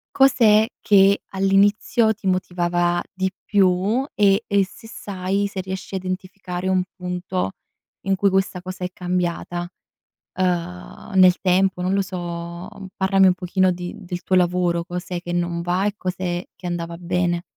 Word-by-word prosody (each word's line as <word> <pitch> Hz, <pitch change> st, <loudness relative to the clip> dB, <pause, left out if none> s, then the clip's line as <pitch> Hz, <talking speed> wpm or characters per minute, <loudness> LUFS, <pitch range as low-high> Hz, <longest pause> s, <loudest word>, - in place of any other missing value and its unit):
cos'è 225 Hz, -5 st, +5 dB
che 200 Hz, -1 st, +5 dB
all'inizio 200 Hz, +3 st, +3 dB
ti 200 Hz, -2 st, -11 dB
motivava 175 Hz, -1 st, +1 dB
di 190 Hz, 0 st, -1 dB
più 200 Hz, +5 st, +2 dB
e 200 Hz, +1 st, +4 dB
e 200 Hz, -2 st, +3 dB
se 220 Hz, +4 st, -14 dB
sai, 195 Hz, -1 st, -2 dB
se 195 Hz, -1 st, -5 dB
riesci 190 Hz, +1 st, -6 dB
a -, -, 0 dB
identificare 185 Hz, 0 st, -5 dB
un 185 Hz, -1 st, +2 dB
punto 180 Hz, -, -3 dB, 0.5 s
in 195 Hz, 0 st, +2 dB
cui 200 Hz, +1 st, +3 dB
questa 190 Hz, -1 st, 0 dB
cosa 185 Hz, 0 st, -8 dB
è -, -, -1 dB
cambiata, 175 Hz, -1 st, -2 dB, 0.7 s
uhm, 180 Hz, +2 st, -3 dB
nel 185 Hz, -1 st, +6 dB
tempo 185 Hz, 0 st, +2 dB
non 185 Hz, +2 st, 0 dB
lo 200 Hz, -, +2 dB
so, 170 Hz, -1 st, -6 dB, 0.3 s
parlami 190 Hz, 0 st, +4 dB
un 180 Hz, -, +3 dB
pochino 185 Hz, 0 st, +1 dB
di 175 Hz, +2 st, -6 dB
del 180 Hz, -2 st, -6 dB
tuo 185 Hz, -, +1 dB
lavoro 175 Hz, -1 st, +2 dB
cos'è 180 Hz, 0 st, -5 dB
che 175 Hz, -, -5 dB
non 175 Hz, -1 st, -1 dB
va 180 Hz, +3 st, 0 dB
e 205 Hz, -, -1 dB
cos'è 180 Hz, -1 st, -3 dB
che 180 Hz, -, -10 dB
andava 170 Hz, -1 st, -4 dB
bene. 175 Hz, -1 st, 0 dB
185 Hz, 155 wpm, -22 LUFS, 175-195 Hz, 0.7 s, nel